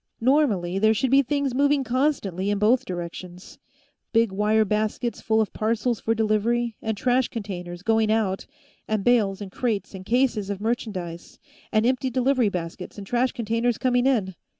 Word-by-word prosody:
Normally, 225 Hz, -9 st, +2 dB
there 220 Hz, +2 st, +4 dB
should 260 Hz, +4 st, 0 dB
be 275 Hz, +1 st, +6 dB
things 280 Hz, -1 st, -1 dB
moving 285 Hz, +1 st, +2 dB
constantly 240 Hz, -, 0 dB
in 205 Hz, -, +1 dB
both 235 Hz, +6 st, +3 dB
directions 180 Hz, -1 st, -7 dB, 0.5 s
big 230 Hz, -3 st, +3 dB
wire 210 Hz, +2 st, +2 dB
baskets 215 Hz, +3 st, -1 dB
full 220 Hz, 0 st, +1 dB
of 220 Hz, -, 0 dB
parcels 225 Hz, +1 st, 0 dB
for 225 Hz, -, 0 dB
delivery, 225 Hz, +2 st, 0 dB
and 220 Hz, -1 st, -2 dB
trash 250 Hz, +2 st, +2 dB
containers, 180 Hz, -5 st, -6 dB
going 220 Hz, 0 st, +2 dB
out, 210 Hz, -4 st, 0 dB, 0.4 s
and 215 Hz, -2 st, -1 dB
bales 210 Hz, -5 st, +2 dB
and 195 Hz, -2 st, -7 dB
crates 220 Hz, -2 st, -2 dB
and 190 Hz, -1 st, -8 dB
cases 235 Hz, -2 st, +1 dB
of 200 Hz, -2 st, -3 dB
merchandise, 200 Hz, -7 st, -4 dB, 0.3 s
and 215 Hz, +1 st, +2 dB
empty 255 Hz, +1 st, +1 dB
delivery 255 Hz, -2 st, +2 dB
baskets 180 Hz, +1 st, -6 dB
and 200 Hz, -, -7 dB
trash 245 Hz, +4 st, +1 dB
containers 230 Hz, +1 st, -1 dB
coming 250 Hz, -1 st, +2 dB
in. 210 Hz, -8 st, +1 dB
220 Hz, 165 wpm, -24 LUFS, 200-245 Hz, 0.5 s, be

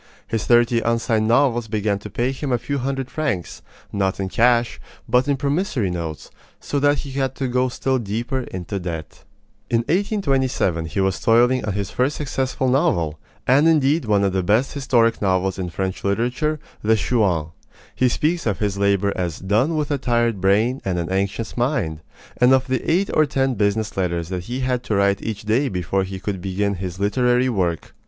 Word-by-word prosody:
His 110 Hz, -2 st, -3 dB
thirty 120 Hz, 0 st, +4 dB
unsigned 115 Hz, -2 st, +1 dB
novels 120 Hz, -1 st, +2 dB
began 105 Hz, -1 st, -1 dB
to 105 Hz, -, -9 dB
pay 120 Hz, +6 st, -1 dB
him 135 Hz, +1 st, -4 dB
a 125 Hz, -, +3 dB
few 140 Hz, +4 st, -3 dB
hundred 135 Hz, 0 st, -3 dB
francs, 130 Hz, -, -3 dB, 0.3 s
not 95 Hz, -1 st, 0 dB
in 95 Hz, -1 st, -2 dB
cash, 120 Hz, +2 st, +2 dB, 0.3 s
but 125 Hz, +3 st, +2 dB
in 140 Hz, -1 st, +1 dB
promissory 140 Hz, -, 0 dB
notes; 85 Hz, -3 st, -5 dB, 0.3 s
so 145 Hz, -, -2 dB
that 145 Hz, +1 st, +3 dB
he 140 Hz, -, -6 dB
had 135 Hz, -1 st, -1 dB
to 135 Hz, -, -2 dB
go 125 Hz, +1 st, +1 dB
still 130 Hz, +1 st, -1 dB
deeper 120 Hz, +4 st, -2 dB
into 95 Hz, +2 st, -4 dB
debt. 80 Hz, -6 st, -6 dB, 0.5 s
In 115 Hz, -1 st, +2 dB
1827 135 Hz, -, 0 dB
he 100 Hz, -, -3 dB
was 95 Hz, -1 st, 0 dB
toiling 120 Hz, +3 st, +3 dB
on 105 Hz, -, -2 dB
his 100 Hz, -1 st, -3 dB
first 130 Hz, +4 st, 0 dB
successful 135 Hz, -2 st, -2 dB
novel, 85 Hz, -, +1 dB, 0.3 s
and 140 Hz, +5 st, +4 dB
indeed 155 Hz, -1 st, +3 dB
one 105 Hz, -2 st, +2 dB
of 100 Hz, -1 st, +1 dB
the 95 Hz, -, +1 dB
best 110 Hz, +8 st, +1 dB
historic 120 Hz, -5 st, +2 dB
novels 95 Hz, -1 st, 0 dB
in 90 Hz, -1 st, -3 dB
French 95 Hz, +2 st, -4 dB
literature 125 Hz, +10 st, 0 dB, 0.2 s
The 110 Hz, +1 st, +3 dB
Chouans. 95 Hz, -9 st, 0 dB, 0.4 s
He 130 Hz, -, +2 dB
speaks 160 Hz, +4 st, 0 dB
of 105 Hz, -, 0 dB
his 100 Hz, -2 st, -2 dB
labor 100 Hz, 0 st, +2 dB
as 85 Hz, -3 st, -2 dB
"done 110 Hz, -, +1 dB
with 150 Hz, -1 st, -1 dB
a 145 Hz, -, 0 dB
tired 120 Hz, -5 st, 0 dB
brain 110 Hz, +7 st, +2 dB
and 95 Hz, -2 st, -1 dB
an 85 Hz, 0 st, -2 dB
anxious 100 Hz, +4 st, -2 dB
mind," 120 Hz, -, -1 dB, 0.4 s
and 125 Hz, +1 st, +5 dB
of 130 Hz, 0 st, +3 dB
the 130 Hz, 0 st, -1 dB
eight 190 Hz, +4 st, +1 dB
or 155 Hz, -1 st, +4 dB
ten 135 Hz, -2 st, 0 dB
business 105 Hz, 0 st, 0 dB
letters 85 Hz, -3 st, -1 dB
that 90 Hz, -2 st, -4 dB
he 125 Hz, +4 st, -4 dB
had 125 Hz, -1 st, 0 dB
to 105 Hz, -, -1 dB
write 100 Hz, 0 st, +2 dB
each 110 Hz, -2 st, -4 dB
day 120 Hz, +6 st, +1 dB
before 90 Hz, +1 st, -1 dB
he 95 Hz, 0 st, -6 dB
could 95 Hz, -2 st, -4 dB
begin 100 Hz, +2 st, -1 dB
his 90 Hz, -1 st, -5 dB
literary 125 Hz, +5 st, +2 dB
work. 90 Hz, -8 st, -2 dB
115 Hz, 190 wpm, -21 LUFS, 95-130 Hz, 0.5 s, and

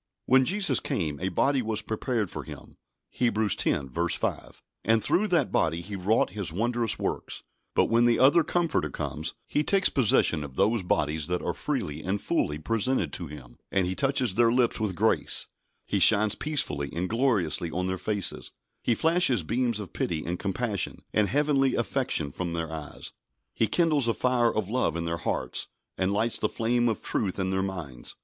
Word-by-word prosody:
When 130 Hz, +1 st, +5 dB
Jesus 185 Hz, -, +2 dB
came, 75 Hz, -6 st, -2 dB
a 95 Hz, -, -1 dB
body 135 Hz, +9 st, +2 dB
was 110 Hz, -2 st, -2 dB
prepared 110 Hz, -3 st, -2 dB
for -, -, -5 dB
Him -, -, -11 dB, 0.4 s
(Hebrews 110 Hz, -5 st, +1 dB
x. 75 Hz, +6 st, 0 dB
5), -, -, -4 dB, 0.2 s
and 115 Hz, -1 st, +3 dB
through 215 Hz, +3 st, +2 dB
that 170 Hz, -8 st, +1 dB
body 80 Hz, +1 st, +1 dB
He 100 Hz, +3 st, -7 dB
wrought 95 Hz, +2 st, +1 dB
His 100 Hz, -4 st, -3 dB
wondrous 115 Hz, +4 st, 0 dB
works; -, -, -4 dB, 0.3 s
but -, -, +4 dB
when 115 Hz, +1 st, +3 dB
the 120 Hz, -1 st, +4 dB
other 145 Hz, +6 st, +5 dB
Comforter 170 Hz, -1 st, 0 dB
comes, -, -, -4 dB
He 150 Hz, -, 0 dB
takes 195 Hz, +3 st, +3 dB
possession 100 Hz, -, +2 dB
of 70 Hz, -3 st, -9 dB
those 110 Hz, +6 st, +2 dB
bodies 80 Hz, -3 st, 0 dB
that 90 Hz, 0 st, -2 dB
are -, -, -1 dB
freely 75 Hz, +1 st, -3 dB
and 100 Hz, +2 st, -1 dB
fully 75 Hz, -6 st, -1 dB
presented 115 Hz, +9 st, 0 dB
to 85 Hz, -, -3 dB
Him, 70 Hz, -5 st, -12 dB
and 95 Hz, -2 st, +2 dB
He 90 Hz, -, -1 dB
touches 135 Hz, -2 st, +1 dB
their 115 Hz, +2 st, +4 dB
lips 120 Hz, -1 st, +2 dB
with 105 Hz, -4 st, -1 dB
grace; -, -, +1 dB, 0.4 s
He -, -, 0 dB
shines 105 Hz, 0 st, +5 dB
peacefully 70 Hz, -, -1 dB
and 90 Hz, +2 st, -1 dB
gloriously 105 Hz, -, +1 dB
on 90 Hz, +3 st, -2 dB
their 95 Hz, 0 st, -2 dB
faces; 100 Hz, 0 st, -3 dB, 0.3 s
He 120 Hz, -, +1 dB
flashes 160 Hz, -, +2 dB
beams 120 Hz, +4 st, 0 dB
of 100 Hz, -5 st, -8 dB
pity 80 Hz, -2 st, -2 dB
and 85 Hz, +1 st, -3 dB
compassion 100 Hz, 0 st, -2 dB
and 105 Hz, -2 st, +2 dB
heavenly 140 Hz, -2 st, +2 dB
affection 120 Hz, -, -1 dB
from 85 Hz, +3 st, -4 dB
their 80 Hz, -1 st, -3 dB
eyes; 80 Hz, -2 st, -7 dB, 0.4 s
He 115 Hz, -, +2 dB
kindles 155 Hz, -6 st, +2 dB
a 115 Hz, -, +1 dB
fire 125 Hz, -2 st, +2 dB
of 105 Hz, -3 st, -2 dB
love 120 Hz, -5 st, 0 dB
in 85 Hz, 0 st, -2 dB
their 85 Hz, 0 st, -2 dB
hearts, -, -, -3 dB, 0.3 s
and 95 Hz, +1 st, 0 dB
lights 110 Hz, +3 st, +1 dB
the -, -, 0 dB
flame 120 Hz, +1 st, +1 dB
of 110 Hz, -, -3 dB
truth 95 Hz, -4 st, -1 dB
in 95 Hz, -1 st, -1 dB
their 95 Hz, 0 st, 0 dB
minds. 80 Hz, -11 st, -6 dB
105 Hz, 185 wpm, -27 LUFS, 85-125 Hz, 0.4 s, When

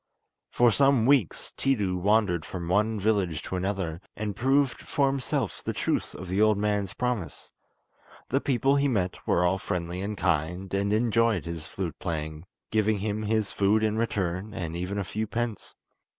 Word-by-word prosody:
For 120 Hz, -1 st, +4 dB
some 135 Hz, -1 st, +4 dB
weeks 130 Hz, -, +2 dB
Tiidu 105 Hz, -9 st, +1 dB
wandered 95 Hz, -3 st, +2 dB
from 85 Hz, 0 st, -6 dB
one 105 Hz, +4 st, +2 dB
village 95 Hz, -7 st, 0 dB
to -, -, -4 dB
another, 90 Hz, -3 st, -2 dB
and 105 Hz, -2 st, -3 dB
proved 135 Hz, +1 st, +2 dB
for 140 Hz, -, +1 dB
himself 135 Hz, -1 st, -1 dB
the -, -, -2 dB
truth -, -, -1 dB
of 95 Hz, -, -7 dB
the 95 Hz, +3 st, 0 dB
old 110 Hz, -1 st, +4 dB
man's 105 Hz, -2 st, 0 dB
promise. 120 Hz, -, -3 dB, 0.8 s
The 135 Hz, +3 st, +1 dB
people 135 Hz, +1 st, +2 dB
he 140 Hz, 0 st, +2 dB
met 95 Hz, -9 st, 0 dB
were 90 Hz, -, +3 dB
all 95 Hz, +2 st, +2 dB
friendly 90 Hz, -1 st, -3 dB
and 105 Hz, +1 st, -3 dB
kind, 90 Hz, +2 st, -1 dB
and 100 Hz, +1 st, +1 dB
enjoyed 115 Hz, -3 st, +2 dB
his 85 Hz, -2 st, -5 dB
flute 85 Hz, -3 st, -5 dB
playing, 80 Hz, -2 st, -4 dB, 0.3 s
giving 110 Hz, -1 st, +2 dB
him 105 Hz, +1 st, -2 dB
his 110 Hz, -1 st, 0 dB
food 105 Hz, +2 st, +2 dB
in 110 Hz, -1 st, +1 dB
return, 100 Hz, -2 st, -2 dB
and 85 Hz, -5 st, -4 dB
even 90 Hz, +3 st, -3 dB
a 100 Hz, -, 0 dB
few 110 Hz, +4 st, -3 dB
pence. 115 Hz, -1 st, -4 dB
100 Hz, 170 wpm, -27 LUFS, 90-110 Hz, 0.8 s, For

